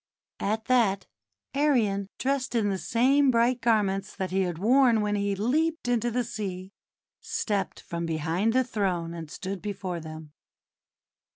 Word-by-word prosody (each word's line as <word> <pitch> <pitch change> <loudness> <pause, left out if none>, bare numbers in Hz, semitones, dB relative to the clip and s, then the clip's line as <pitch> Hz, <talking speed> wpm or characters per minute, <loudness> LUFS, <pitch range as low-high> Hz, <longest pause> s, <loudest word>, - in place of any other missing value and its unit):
At 220 +2 -1
that 215 -7 +2 0.5
Arion, 235 -9 +2
dressed 265 -2 -1
in 215 -3 +2
the 190 - -2
same 270 +7 +3
bright 240 0 +2
garments 205 -3 +1
that 185 -2 -3
he 190 +1 +1
had 175 -3 -1
worn 235 +3 +4
when 210 0 0
he 200 -1 0
leaped 305 - 0
into 240 -1 +1
the 245 +1 0
sea, 190 -4 -5 0.5
stepped 200 -4 -2
from 170 0 -4
behind 165 +7 0
the 260 +1 +4
throne 185 -8 -2
and 165 -2 -7
stood 190 +3 -5
before 190 -4 -4
them. 155 -1 -9
205 Hz, 150 wpm, -27 LUFS, 185-245 Hz, 0.5 s, worn